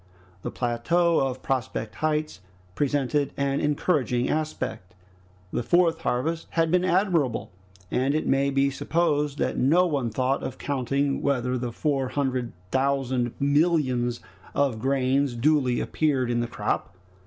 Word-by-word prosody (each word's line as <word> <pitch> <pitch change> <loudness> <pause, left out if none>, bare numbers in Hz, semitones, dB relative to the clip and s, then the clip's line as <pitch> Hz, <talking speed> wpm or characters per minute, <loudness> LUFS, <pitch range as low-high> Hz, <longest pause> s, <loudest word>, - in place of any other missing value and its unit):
The - - -4
plateau 165 +9 +1
of 130 -1 -2
Prospect 120 -4 -2
Heights 155 -7 -1 0.3
presented 145 +2 0
an 140 0 0
encouraging 140 -5 +1
aspect. 150 -12 -3 0.6
The - - 0
fourth 170 +7 +3
harvest 160 +7 -1
had 165 -1 +1
been 180 0 +3
admirable 175 - +1 0.4
and 135 +3 +1
it 155 - 0
may 135 +1 +2
be 140 0 +2
supposed 150 -1 0
that - - -1
no 165 +8 +4
one 140 -8 -1
thought 130 +4 0
of - - -5
counting 140 0 -1
whether 130 -3 0
the 125 -1 -3
four 135 +1 0
hundred 130 -3 -1 0.2
thousand 130 -3 0
millions 140 -5 +2 0.3
of 135 -6 +1
grains 135 +1 +1
duly 130 -1 +2
appeared 135 -6 0
in 120 - +1
the 120 - -1
crop. 95 - -3
140 Hz, 135 wpm, -26 LUFS, 125-150 Hz, 0.6 s, no